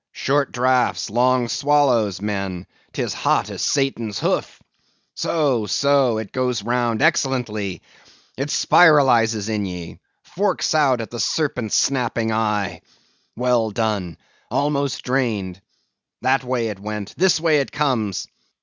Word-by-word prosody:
Short 140 0 0
draughts—long 125 0 +1
swallows, 125 -9 +1
men; 95 -3 -3 0.3
'tis - - -3
hot - - 0
as - - -6
Satan's 120 -7 -1
hoof. - - -2 0.5
So, 135 -10 0
so; 140 -1 +2
it 110 -3 -6
goes 125 -4 -1
round 120 +1 0
excellently. 120 - 0 0.5
It 135 +3 -3
spiralizes 120 - +4
in 105 -3 -2
ye; 90 -2 -8 0.2
forks 195 -2 -1
out 135 -6 +3
at 115 - -8
the 120 - -6
serpent 125 -4 -1
snapping 120 -4 +1
eye. 105 -5 -1 0.5
Well 120 -2 +1
done; 105 -6 -2 0.3
almost 140 -2 -1
drained. 110 -8 -2 0.6
That 135 0 +2
way 125 -3 -1
it 100 -2 -7
went, 105 0 -6
this 180 -2 +3
way 155 -2 +3
it 140 - -3
comes. 115 - -1
120 Hz, 120 wpm, -21 LUFS, 105-135 Hz, 0.6 s, spiralizes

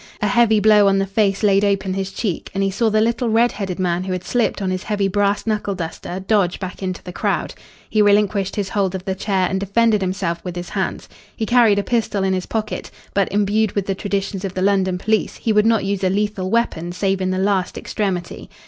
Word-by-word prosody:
A - - 0
heavy 220 0 +4
blow 210 -1 +5
on 195 0 +3
the 195 - +1
face 195 0 0
laid 200 -1 +4
open 195 -2 +1
his 195 0 -2
cheek, 190 -3 -3
and 195 - +1
he 195 - +1
saw 225 +4 +1
the 215 0 +2
little 235 +1 +1
red 230 +2 +3
headed 190 -4 -4
man 180 -1 0
who 185 0 -3
had 185 -1 -4
slipped 240 +1 0
on 190 -2 -1
his 185 0 -2
heavy 205 -1 -1
brass 200 +1 0
knuckle 210 -3 -1
duster 175 +1 -5
dodge 190 -2 +1
back 185 0 -6
into 185 -1 -4
the 180 - -8
crowd. - - -1 0.3
He 215 - +2
relinquished 205 -1 +2
his 200 -2 -2
hold 195 -2 0
of 185 0 -6
the 190 - -1
chair 190 -1 0
and 190 - -1
defended 210 +2 +2
himself 185 -3 -2
with 180 -2 -5
his 175 0 -5
hands. - - -3 0.3
He 220 - -2
carried 235 -3 +4
a 205 - +1
pistol 215 -4 0
in 190 0 +1
his 185 -1 -2
pocket, 220 -1 -3 0.2
but, 200 -1 +1
imbued 210 +1 +1
with 200 -2 -1
the 195 - -1
traditions 195 0 -3
of 190 -2 -4
the 185 - -1
London 190 -2 +2
police, 220 +4 0
he 225 - -1
would 210 +1 +4
not 225 -3 +2
use 200 0 -2
a 185 - +3
lethal 200 -1 -1
weapon 180 -7 0
save 195 +1 -1
in 185 - 0
the 185 - -1
last 190 -1 0
extremity. 185 -5 -3
195 Hz, 235 wpm, -20 LUFS, 185-210 Hz, 0.3 s, blow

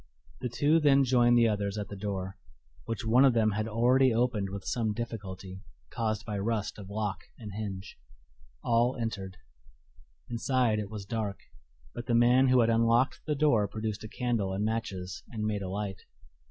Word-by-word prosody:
The 125 - -3
two 145 +8 +3
then 140 -3 +5
joined 120 -2 +4
the 115 -1 +5
others 100 -1 -1
at 105 -1 -4
the 100 - -6
door, 95 -1 -4 0.5
which 115 0 -4
one 120 +4 +5
of 135 -3 +5
them 110 -2 +3
had 105 +2 -2
already 125 +4 +3
opened 115 -4 0
with 100 0 -7
some 110 -3 0
difficulty, 95 -5 -6 0.3
caused 110 -2 -2
by 105 -2 -3
rust 105 0 -2
of 100 -2 -9
lock 105 -1 -2 0.2
and 105 -3 -8
hinge. 100 -2 -6 0.6
All 120 +2 +2
entered. 100 -5 -4 0.9
Inside 120 -1 +1
it 105 -2 -4
was 105 -2 -7
dark, 105 -2 -3 0.6
but 120 - -7
the 120 - +2
man 125 +3 +5
who 130 -1 +5
had 115 - +3
unlocked 115 +3 +3
the 150 - +1
door 140 -8 +3
produced 110 +1 -4
a - - -6
candle 115 -7 -1
and 100 +2 -1
matches 100 -5 -3
and 110 -3 -4
made 105 -1 -1
a 95 - -4
light. 100 -1 -4
110 Hz, 180 wpm, -29 LUFS, 100-120 Hz, 0.9 s, then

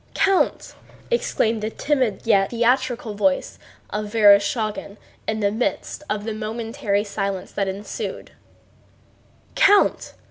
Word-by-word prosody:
"Count!" 390 -1 +1 0.4
exclaimed 225 - +1
the 215 - -2
timid 255 -5 0
yet 195 -4 +3
theatrical 240 -1 0
voice 275 +7 0 0.3
of 210 0 -4
Vereshchágin 210 -1 +3 0.3
in 220 0 -1
the 200 -1 +2
midst 230 +6 -2
of 210 -1 -2
the 220 0 -3
momentary 220 0 -2
silence 200 -2 -4
that 200 -1 -1
ensued, 195 +2 -5 1.2
"Count! 405 0 +3
220 Hz, 110 wpm, -22 LUFS, 205-240 Hz, 1.2 s, yet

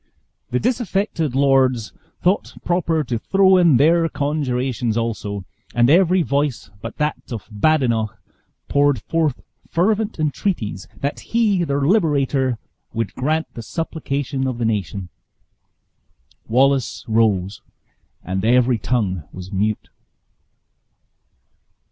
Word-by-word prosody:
The 125 - 0
disaffected 200 - -1
lords 130 -6 +2 0.3
thought 185 +3 +1
proper 165 -3 +1
to 120 -4 -2
throw 190 - +4
in 170 -7 +5
their 165 +4 +4
conjurations 130 -6 -1
also; 105 -4 -3 0.3
and 120 +2 +4
every 180 +1 +4
voice 140 - -1
but 115 +1 -7
that 150 -3 -2
of 115 -4 -6
Badenoch 115 -3 +1 0.5
poured 145 -3 +3
forth 155 +1 -1 0.3
fervent 210 +5 +1
entreaties 150 - -2
that 140 +1 -2
he, 215 -6 +1
their 140 -3 -1
liberator, 140 - +2 0.4
would 115 -2 -2
grant 155 +5 -1
the 115 - -7
supplication 140 -2 -3
of 130 -2 -3
the 120 - -1
nation. 100 -4 -2 1.4
Wallace 135 +2 +2
rose, 105 -4 +1 0.6
and 95 +2 -3
every 125 +1 +3
tongue 95 - -1
was 95 0 -9
mute. 105 +2 -1
135 Hz, 110 wpm, -21 LUFS, 115-160 Hz, 1.4 s, in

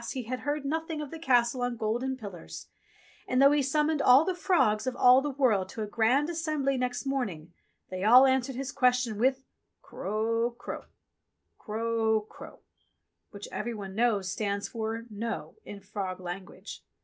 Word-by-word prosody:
he 255 - -4
had 250 +3 -4
heard 290 0 -3
nothing 320 +2 -2
of 295 -2 -6
the 325 - -7
Castle 245 -4 +2
on 245 -1 -2
golden 240 +5 -2
pillars, 200 -8 -9 0.6
and 255 - +1
though 275 +1 +7
he 295 0 +3
summoned 300 +2 +1
all 260 +5 +6
the 375 - 0
frogs 260 - +1
of 255 - -1
all 250 +2 +6
the 295 - -2
world 240 -9 +1
to 220 - -5
a - - -2
Grand 235 +7 +2
Assembly 310 -5 -1
next 250 +1 -2
morning, 195 - -3 0.4
they 185 0 -4
all 245 +5 +8
an 265 0 +3
swered 260 +1 -7
his 270 +1 -4
question 250 -4 +1
with: 265 +2 +2 0.2
" - - -53
Kro 230 +3 -2
kro, - - -7 0.7
Kro 220 -1 0
kro^^ - - -12 0.7
which 200 -1 -9
every 235 +2 -4
one 195 -2 -7
knows 205 -4 +1
stand 200 0 -2
for 225 0 -4
"No" 225 +2 -5
in 205 - -8
frog 190 -2 -5
language. 185 +2 -8
240 Hz, 175 wpm, -28 LUFS, 215-270 Hz, 0.7 s, all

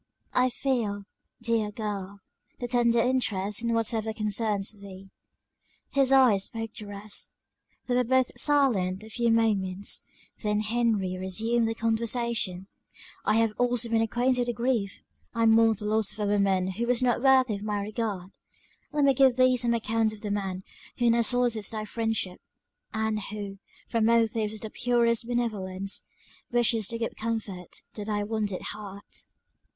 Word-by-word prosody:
"I 250 0 +3
feel, 235 -6 -1 0.4
dear 230 -2 +1
girl, 200 -2 -5 0.4
the 245 - -3
tendered 235 -1 +3
interest 210 -5 0
in 235 0 -1
whatever 225 -1 0
concerns 210 -1 -1
thee." 195 -2 -12 0.8
His 275 -2 +3
eyes 245 -8 +5
spoke 225 -1 -6
the 210 - -6
rest. 205 +1 -6 0.5
They 250 - -1
were 250 - +3
both 260 +1 +2
silent 215 -10 +2
a 220 - -12
few 235 +2 +1
moments; 205 -4 0 0.3
then 210 -1 0
Henry 215 -5 0
resumed 225 +5 0
the 225 - -2
conversation. 225 -4 0 0.6
"I 210 - +3
have 225 -1 +2
also 245 -1 +1
been 225 0 +2
acquainted 245 +3 +1
with 240 - -2
grief! 235 -5 -1 0.3
I 230 0 +2
mourn 225 0 +5
the 210 - -5
loss 215 0 +1
of - - -13
a - - +1
woman 195 -2 +2
who 230 +6 -3
was 245 +1 +2
not 245 -1 +2
worthy 260 -3 +5
of 200 - -5
my 210 -1 -2
regard. 200 -3 -3 0.6
Let 295 -1 +1
me 275 -1 +5
give 265 -1 +5
thee 255 0 +5
some 235 -1 +1
account 225 -1 0
of 210 - -11
the 210 - -3
man 190 -2 -3 0.3
who 240 -1 +3
now 235 0 +3
solicits 235 -2 +3
thy 215 -1 -4
friendship; 225 -5 -2 0.5
and 220 0 -1
who, 200 -1 -6 0.3
from 230 -2 +1
motives 230 -1 +3
of 215 -1 -2
the 220 - -6
purest 235 -2 +2
benevolence, 200 -5 -2 0.4
wishes 235 -3 +3
to 230 - -2
give 230 0 -3
comfort 215 -6 -4
to 210 - -6
thy 205 0 -1
wounded 210 -3 -2
heart." 200 -1 -7
225 Hz, 160 wpm, -27 LUFS, 205-235 Hz, 0.8 s, eyes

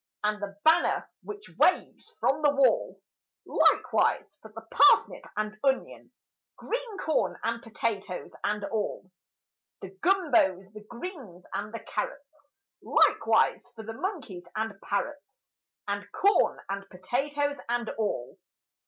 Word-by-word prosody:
And 210 0 0
the 200 -1 -6
banner 320 +1 +4
which 415 0 -9
waves - - +2
from 290 +3 +2
the 295 - +5
wall; 275 -2 +2 0.5
Likewise - - +2
for 220 - -13
the 225 +1 -9
parsnip 390 - +5
and 215 0 -2
onion, 270 -1 -1 0.4
Green 480 -3 -4
corn 315 -5 0
and 230 +1 -1
potatoes 215 -5 -3
and 210 0 -1
all! 205 -3 -3 0.7
The - - -8
gumbos, 240 - +2
the 215 0 -10
greens, 235 - -8
and 200 +2 -3
the 230 -1 -6
carrots— 290 +3 -6 0.2
Likewise - - +3
for 220 - -8
the 225 +1 -6
monkeys 225 - -5
and 220 0 -2
parrots, 290 - -4 0.4
And 205 0 -3
corn 405 +1 +3
and 195 0 -5
potatoes 285 +10 -1
and 240 -1 0
all! 205 - -3
230 Hz, 125 wpm, -28 LUFS, 205-290 Hz, 0.7 s, the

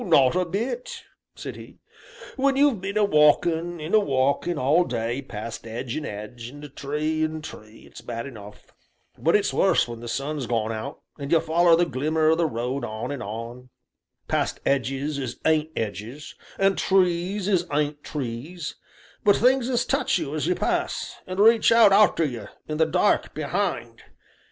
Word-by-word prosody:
"Not 140 - +4
a 185 0 +2
bit," 265 - -4 0.3
said - - -7
he; - - -12 0.6
"when 275 0 +2
you've 275 -7 +3
been 200 +2 -3
a 215 - +4
walkin' 165 +1 +3
an' 155 +5 -6
a 215 - +7
walkin' 140 +1 0
all 150 +6 +3
day 120 -1 -2
past 115 -2 -7
'edge 115 +2 -5
and 155 - -3
'edge, 105 +3 -7
and 145 +1 -11
tree 155 +3 -1
and 155 0 -3
tree, 110 -6 -11
it's - - -13
bad 115 -1 -5
enough, 105 -6 -12 0.4
but - - +2
it's - - +2
worse - - +3
when 120 -1 -7
the 120 - -8
sun's 140 +2 -3
gone 115 -2 0
out, 110 -1 -6 0.2
an' 140 -1 -5
you 165 0 +5
foller 170 +2 +4
the 175 +1 +3
glimmer 155 +1 +1
o' - - +4
the 165 0 +1
road 125 +2 -3
on 110 +5 -4
and 140 -3 -5
on, 115 +4 -7 0.6
past - - -1
'edges 140 +2 0
as 125 -3 -5
ain't 155 -1 +2
'edges, 110 +7 -5 0.2
and 195 0 +2
trees 185 +1 +1
as 180 -4 +1
ain't 145 0 -1
trees, 150 +5 -5 0.5
but 205 -3 +5
things 255 +1 +3
as 245 -2 +1
touch - - +1
you - - -4
as - - -1
you - - +2
pass, - - -2
and 185 +1 -5
reach 225 +2 +6
out 230 -4 +7
arter 200 -5 +5
you 120 -7 -5 0.2
in 155 - -3
the 160 0 +3
dark, 180 +5 +1
behind. 155 - -2
150 Hz, 175 wpm, -24 LUFS, 120-180 Hz, 0.6 s, a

